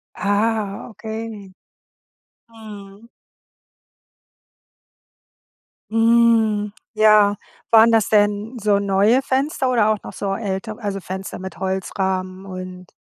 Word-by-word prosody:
Ah, 205 0 -1
okay. 220 -3 -8 1.0
Mhm. 210 -1 -12 2.8
Hm, 225 -2 +3 0.2
ja. 215 -1 +5 0.3
Waren 225 0 +6
das 225 -2 +3
denn 210 +3 +1
so 205 -2 +2
neue 200 +6 +2
Fenster 265 0 -1
oder 225 -4 +3
auch 215 - 0
noch - - -9
so 195 -1 -3
ältere? 210 +1 -4
Also, 200 -1 -3
Fenster 190 +1 -7
mit 190 +1 -8
Holzrahmen 190 0 -3
und 185 -1 -9
210 Hz, 95 wpm, -20 LUFS, 195-225 Hz, 2.8 s, Waren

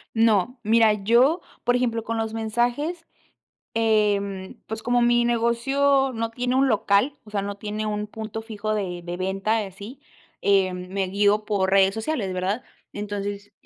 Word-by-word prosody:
No, 225 +2 +2
mira, 225 0 +5
yo, 235 - +3 0.2
por 245 0 +2
ejemplo, 235 -2 0
con 230 +1 -3
los 225 0 -2
mensajes, 240 +10 -1 0.7
em, 205 -4 +1
pues, 220 0 -5
como 245 0 +2
mi 240 0 +3
negocio 270 +4 +2
no 225 0 -2
tiene 245 +2 -1
un 270 +1 +3
local, 220 +5 +2
o - - -13
sea, 205 -1 -1
no 200 +1 -4
tiene 210 +1 -4
un 210 0 -2
punto 220 +1 -6
fijo 215 -1 -4
de 185 -4 -3
de 175 0 -5
venta 195 +4 0
y - - -3
así, 205 +8 -11 0.4
em, 185 -2 +1
me 190 0 -1
guío 205 +2 +2
por 200 -3 0
redes 195 0 +5
sociales, 220 -3 -2
¿verdad? 190 +6 -2 0.3
Entonces 205 0 -5
215 Hz, 165 wpm, -24 LUFS, 200-240 Hz, 0.7 s, mira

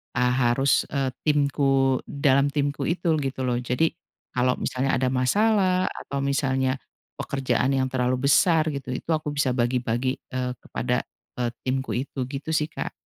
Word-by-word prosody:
a 125 0 +3
harus, 130 +2 +2
eee, 135 -2 +1 0.2
timku 135 -2 +3
dalam 140 -1 +2
timku 140 -1 -1
itu 170 -1 +1
gitu 135 -2 -3
loh, 120 -1 +1
jadi 125 +6 +1 0.5
kalau 125 0 +3
misalnya 130 +2 0
ada 130 - +1
masalah 185 - +2
atau 140 0 -5
misalnya 135 -1 +1 0.4
pekerjaan 135 0 0
yang 130 -1 +1
terlalu 125 0 0
besar 160 +1 +4
gitu, 140 -3 -5
itu 130 - -6
aku 155 -2 -1
bisa 145 -3 +1
bagi-bagi, 125 +1 0 0.2
eee, 125 -1 -2
kepada, - - -1 0.4
eee, 120 -1 +1 0.2
timku 130 +1 -1
itu 130 +1 -3
gitu 140 +3 -5
sih, 155 0 +1
Kak. - - -4
135 Hz, 150 wpm, -25 LUFS, 130-145 Hz, 0.5 s, besar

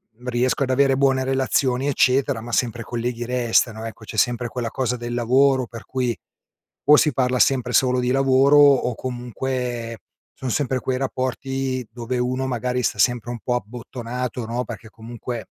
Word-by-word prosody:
mhmm, 125 +3 -14
riesco 125 +3 +1
ad 130 - -2
avere 135 0 +3
buone 135 -1 +2
relazioni, 130 0 +1
eccetera, 130 -2 +2
ma 120 +1 -8
sempre 120 -1 0
colleghi 120 +1 -3
restano, 120 -2 +1
ecco, 115 -1 -9
c'è 110 - -8
sempre 120 +3 +1
quella 120 -1 -3
cosa 125 -2 -1
del 120 0 -5
lavoro 130 +2 +3
per 115 -1 -10
cui, 125 -3 -1 0.7
o 150 - +8
si 150 -2 +3
parla 125 0 +1
sempre 125 -2 +2
solo 125 +1 +3
di 125 0 0
lavoro 135 +2 +4
o, 140 -4 +5
comunque, 125 -1 -4 0.3
son 130 - -5
sempre 130 0 0
quei 130 0 -2
rapporti 130 0 -2
dove 120 +1 -4
uno 130 +2 -1
magari 125 0 -1
sta - - 0
sempre 120 -2 +2
un 120 - -4
po' 125 - 0
abbottonato, 125 +1 -5
no, 120 +2 -2
perché 110 0 -9
comunque, 115 +1 -7
125 Hz, 170 wpm, -22 LUFS, 120-130 Hz, 0.7 s, o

